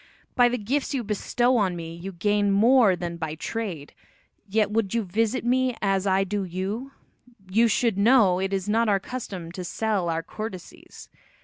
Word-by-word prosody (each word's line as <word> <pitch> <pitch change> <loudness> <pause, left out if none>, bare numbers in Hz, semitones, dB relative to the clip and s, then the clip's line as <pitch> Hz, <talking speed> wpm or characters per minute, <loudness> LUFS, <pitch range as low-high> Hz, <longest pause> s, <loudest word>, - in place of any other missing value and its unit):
By 245 -1 +5
the 250 - -1
gifts 265 +6 -2
you 250 - -1
bestow 240 +4 +1
on 190 -5 +1
me 165 -1 -6
you 180 +3 -7
gain 205 +3 +1
more 220 0 +5
than 170 -1 -5
by 160 -2 -4
trade, 175 -5 -5 0.5
yet 210 0 +1
would 220 -1 0
you 230 - +1
visit 225 +6 -1
me 255 0 +1
as 195 -1 0
I 190 0 +3
do 200 +1 -2
you, 195 +9 -4 0.5
you 225 +5 +3
should 225 -2 +1
know 205 -5 +5
it 190 +1 -2
is 195 0 -2
not 225 +1 +2
our 200 -1 +3
custom 190 -7 -7
to 180 +1 -6
sell 200 -1 -1
our 165 0 -1
courtesies. 200 0 -9
205 Hz, 180 wpm, -25 LUFS, 185-230 Hz, 0.5 s, By